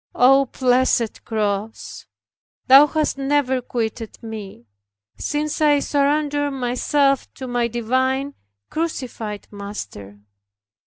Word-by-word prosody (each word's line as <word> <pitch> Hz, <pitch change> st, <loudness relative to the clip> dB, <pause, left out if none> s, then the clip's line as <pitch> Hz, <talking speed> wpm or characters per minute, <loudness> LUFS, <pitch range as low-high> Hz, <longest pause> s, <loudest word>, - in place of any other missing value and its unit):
O 270 Hz, +2 st, +5 dB
blessed 250 Hz, -2 st, +1 dB
cross, 215 Hz, -1 st, -3 dB, 0.6 s
thou 275 Hz, +3 st, +8 dB
hast 305 Hz, -2 st, -1 dB
never 270 Hz, -2 st, +1 dB
quitted 230 Hz, -2 st, -4 dB
me, 210 Hz, -, -8 dB, 0.5 s
since 300 Hz, +1 st, -2 dB
I 295 Hz, -1 st, +5 dB
surrendered 290 Hz, 0 st, 0 dB
myself 270 Hz, +2 st, +1 dB
to 260 Hz, -, -7 dB
my 245 Hz, -1 st, 0 dB
divine, 260 Hz, +4 st, 0 dB, 0.4 s
crucified 250 Hz, -10 st, -4 dB
Master. 200 Hz, -, -8 dB
255 Hz, 95 wpm, -21 LUFS, 225-285 Hz, 0.6 s, thou